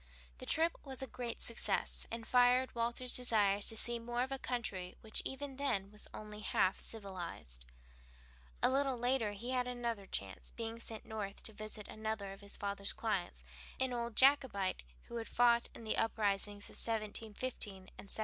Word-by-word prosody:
The - - -8
trip 330 +1 +2
was 265 -1 -5
a - - -1
great 245 -3 -5
success, 230 - +2
and 230 0 -5
fired 250 +1 +5
Walter's 240 +2 +2
desires 205 -5 +5
to 225 - +3
see 235 +1 +1
more 240 +1 -1
of 260 - -4
a 270 - -1
country 200 -9 -3
which 220 -1 0
even 270 0 -5
then 210 -9 0
was 210 - 0
only 210 0 -7
half 190 -2 +2
civilized. 175 - -4 1.0
A - - +7
little 270 -1 +2
later 245 -3 +1
he 235 +5 -4
had 250 -1 +1
another 235 -5 -2
chance, 95 - -3
being 230 0 -5
sent 225 -1 -3
north 210 -3 -5
to 220 - -2
visit 215 0 -4
another 215 -2 -3
of 195 - -10
his 200 0 -2
father's 200 0 -1
clients, 180 - -2 0.4
an 260 -1 +1
old 235 -2 -2
Jacobite 260 -9 +4 0.2
who 235 - -6
had 225 - -4
fought 235 -1 +4
in - - -9
the 220 - 0
uprisings 205 -2 +1
of - - -9
1715 220 +1 -1
and 190 -1 -12
1745. 200 +2 -6
225 Hz, 175 wpm, -36 LUFS, 205-245 Hz, 1.0 s, A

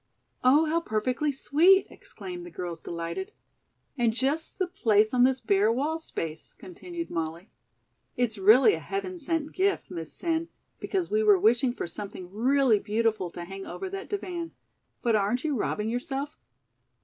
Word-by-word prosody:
"Oh, 285 +5 +5
how 325 +2 +1
perfectly 250 +4 0
sweet," 340 +8 +4
exclaimed 355 -2 -9
the 350 - -9
girls, 175 - -6
delighted. 170 - -5 0.6
"And 235 -4 +2
just 275 +6 -1
the 375 - +1
place 220 - +2
on 250 0 +5
this 260 0 +2
bare 210 -1 +3
wall 295 +7 -1
space!" 165 - -6
continued 345 -1 -7
Molly. 165 +3 -4 0.7
"It's 230 -4 0
really 230 - +7
a - - -2
heaven 370 -2 -4
sent 325 -1 -2
gift, 385 - 0
Miss 165 -3 -5
Sen, 330 -1 -1 0.3
because 375 -3 -2
we 430 +1 +3
were 420 -2 +6
wishing 245 -3 +3
for - - -5
something 185 0 -7
really 250 +1 +3
beautiful 215 -3 0
to 175 +1 -7
hang 195 +2 -8
over 380 -1 -6
that 390 0 -6
divan. 350 -5 -4 0.5
But 230 -2 +3
aren't 215 +4 +1
you 305 -3 0
robbing 210 -1 -1
yourself?" 270 +4 -3
260 Hz, 160 wpm, -27 LUFS, 210-335 Hz, 0.7 s, really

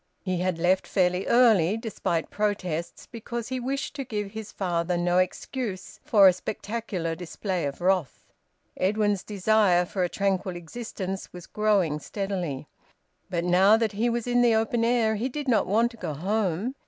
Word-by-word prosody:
He 185 -2 -1
had 180 -1 0
left 180 +3 +2
fairly 180 -1 +1
early, 220 -6 +4
despite 195 -7 -3
protests, 185 -6 -2
because 235 +1 -6
he 260 0 -2
wished 275 +3 -3
to 275 - -2
give 210 -5 -4
his 220 -1 -7
father 175 -2 -1
no 175 +1 +2
excuse 190 +2 -3
for 200 -3 +6
a 185 - +6
spectacular 200 -3 -4
display 180 +1 -3
of 140 -1 -4
wrath; 180 -6 0 0.5
Edwin's 205 0 +1
desire 200 -3 +3
for 185 +1 -2
a 175 - 0
tranquil 195 -1 -1
existence 190 +1 -6
was 180 -1 -10
growing 200 -8 +1
steadily. 180 -6 -4 0.6
But 170 -1 -1
now 190 +5 +5
that 225 -2 0
he 225 +4 0
was 235 -1 -2
in 245 0 +2
the 235 -2 +4
open 225 +1 +1
air, 230 -2 +2
he 245 +5 -1
did 290 +2 -5
not 235 -4 +2
want 230 +4 +2
to 235 - -14
go 160 -8 -4
home. 200 - -1
200 Hz, 165 wpm, -26 LUFS, 180-225 Hz, 0.6 s, for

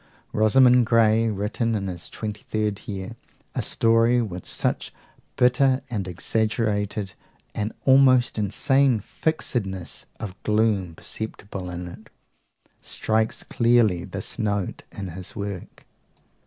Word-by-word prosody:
Rosamund 125 +3 +5
Grey, 115 -1 +4
written 110 +3 -1
in 100 -2 -2
his 90 -3 -5
twenty 105 -1 -6
third 105 -2 -3
year, 100 +2 -5 0.4
a 125 - -1
story 115 +2 +3
with 95 -6 -4
something - - -1 0.5
bitter 130 +2 +3
and 100 -5 -2
exaggerated, 105 +1 -1 0.4
an 105 +1 -2
almost 130 -3 +5
insane 135 +4 +2
fixedness 100 - -3
of 100 -4 -7
gloom 105 -5 +1
perceptible 100 -2 -5
in 90 0 -5
it, 85 - -12 0.7
strikes 110 0 0
clearly 115 -7 +3
this - - -5
note 100 -3 -1
in 95 -2 -6
his 90 +2 -6
work. 100 -4 -6
110 Hz, 115 wpm, -24 LUFS, 100-120 Hz, 0.7 s, Rosamund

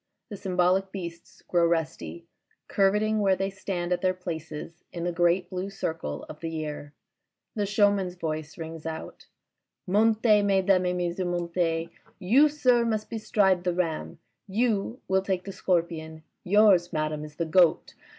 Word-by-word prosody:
The 210 - -6
symboHc 190 0 +1
beasts 170 -4 -8
grow 170 -1 +3
resty, 165 0 -2 0.4
curveting 210 +2 +2
where 195 -2 +3
they 195 +1 -2
stand 180 -2 -3
at 175 - -2
their 185 -1 +1
places 165 -2 -7
in 170 - -5
the 175 - 0
great 175 +1 +2
blue 185 +1 -3
circle 160 - -4
of 150 - -10
the 165 - -4
year. 150 -2 -5 0.6
The 205 -3 -1
Showman's 200 -3 +2
voice 155 -3 -4
rings 160 -1 -7
out. 160 0 -7 0.3
" - - -59
Montez, 215 +1 +4
mesdames 190 -2 +3
et 180 - 0
messieurs, 175 +1 -2
montez. 170 -1 -1 0.3
You, 250 +11 +4
sir, 255 -5 +3
must 220 -2 -2
bestride 205 -5 +2
the 180 -1 0
Ram. 160 - -2 0.3
You 225 +2 0
will 190 0 +2
take 190 -2 -2
the 195 - -6
Scorpion. 165 -4 -2 0.2
Yours, 190 -3 +4
madame, 155 -2 -2
is 150 -1 -10
the 170 - -2
Goat. 175 0 +3
180 Hz, 155 wpm, -27 LUFS, 165-200 Hz, 0.6 s, Montez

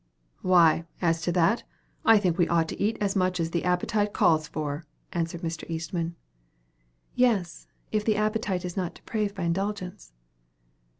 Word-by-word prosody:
"Why, 170 -2 +4
as 165 -2 +1
to 175 - 0
that, 180 +7 +3 0.4
I 225 -1 +7
think 185 -5 +1
we 175 - +4
ought 165 -1 +2
to - - -6
eat 215 +3 +1
as 200 -2 0
much 185 -1 +1
as 165 0 -1
the 170 - -1
appetite 205 +4 +1
calls 155 -2 +3
for," 150 +1 -4 0.3
answered 170 0 -2
Mr. 165 0 -4
Eastman. 165 +1 -3 1.0
"Yes; 210 -9 +1 0.2
if 215 -1 +1
the 215 0 +2
appetite 215 -3 0
is 180 - -5
not 180 -3 -2
depraved 210 -2 -3
by 190 - -4
indulgence." 185 - -3
180 Hz, 160 wpm, -27 LUFS, 165-205 Hz, 1.0 s, I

